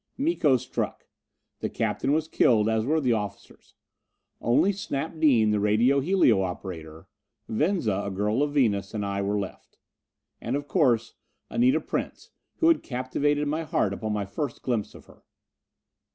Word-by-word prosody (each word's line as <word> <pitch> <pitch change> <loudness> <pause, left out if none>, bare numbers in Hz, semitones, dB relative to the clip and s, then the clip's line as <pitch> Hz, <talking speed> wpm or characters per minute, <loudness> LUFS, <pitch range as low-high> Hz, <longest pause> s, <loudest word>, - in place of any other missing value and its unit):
Miko 270 - +2
struck. - - -4 0.5
The - - -2
captain 135 - -1
was 155 +1 +1
killed, 110 -8 +3
as 110 +1 0
were 160 +2 +2
the 130 -5 +2
officers. 105 -3 -6 0.7
Only 125 +12 +3
Snap 160 -4 -4
Dean, 120 -9 +4
the 105 - +1
radio 110 +7 +3
helio 140 - +3
operator, 85 -4 -6 0.4
Venza, 115 - 0
a - - -3
girl 105 +6 0
of 145 0 +1
Venus, 105 -7 +1
and 105 -1 -2
I 100 0 -2
were 100 +1 0
left. 100 -2 -7 0.6
And, 120 +4 -2
of 145 0 -4
course, 120 -5 +2 0.4
Anita 250 +3 +3
Prince, - - -5 0.2
who 330 - +3
had 335 - +3
captivated 145 +3 -1
my 155 +3 -1
heart 155 - 0
upon 110 +2 -4
my 105 -1 -1
first 100 +10 -5
glimpse 115 -5 -2
of - - -14
her. - - -19
120 Hz, 155 wpm, -26 LUFS, 105-150 Hz, 0.7 s, Dean